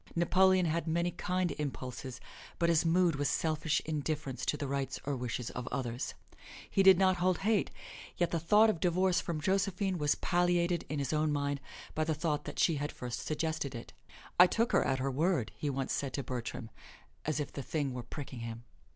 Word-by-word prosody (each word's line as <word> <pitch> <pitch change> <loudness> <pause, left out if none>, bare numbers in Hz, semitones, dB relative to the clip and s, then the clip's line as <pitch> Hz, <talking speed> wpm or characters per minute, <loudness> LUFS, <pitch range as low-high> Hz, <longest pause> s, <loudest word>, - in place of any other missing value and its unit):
Napoleon 185 +2 +4
had 165 0 -1
many 170 +2 +1
kind 180 0 -1
impulses, 130 -3 -5 0.4
but 170 - +2
his 165 -1 +4
mood 170 -2 +3
was 145 -1 +1
selfish 155 -1 0
indifference 150 -3 -3
to 150 - +1
the 145 -1 -3
rights 135 0 -2
or 140 0 -1
wishes 125 -1 -3
of 125 0 -6
others. 125 -2 -3 0.5
He 195 - +2
did 190 -1 +8
not 185 -1 +4
hold 180 0 +2
hate, 215 -2 +2 0.5
yet 175 - +1
the 170 - +1
thought 210 +7 +5
of 170 - -6
divorce 180 +1 +2
from 165 -3 -3
Josephine 190 +2 0
was 145 -1 +2
palliated 175 -1 +1
in 150 - -2
his 140 0 -1
own 155 0 +2
mind 140 -1 -1 0.3
by 155 - 0
the 155 0 0
thought 155 -1 -1
that - - -7
she 165 -4 +3
had 145 +1 -2
first 120 -1 -5
suggested 155 -3 -2
it. 115 - -8 0.5
"I 180 - +10
took 230 +6 +1
her - - +4
at 135 - +1
her 135 +1 -1
word," 150 - +1
he 150 - -2
once 135 -1 -2
said 140 -2 -2
to 140 - -2
Bertram, 120 -2 -5 0.5
as 155 0 0
if 145 - -4
the 140 - -4
thing 140 0 -2
were 125 - -4
pricking 130 0 -7
him. 115 0 -6
155 Hz, 200 wpm, -32 LUFS, 135-175 Hz, 0.5 s, I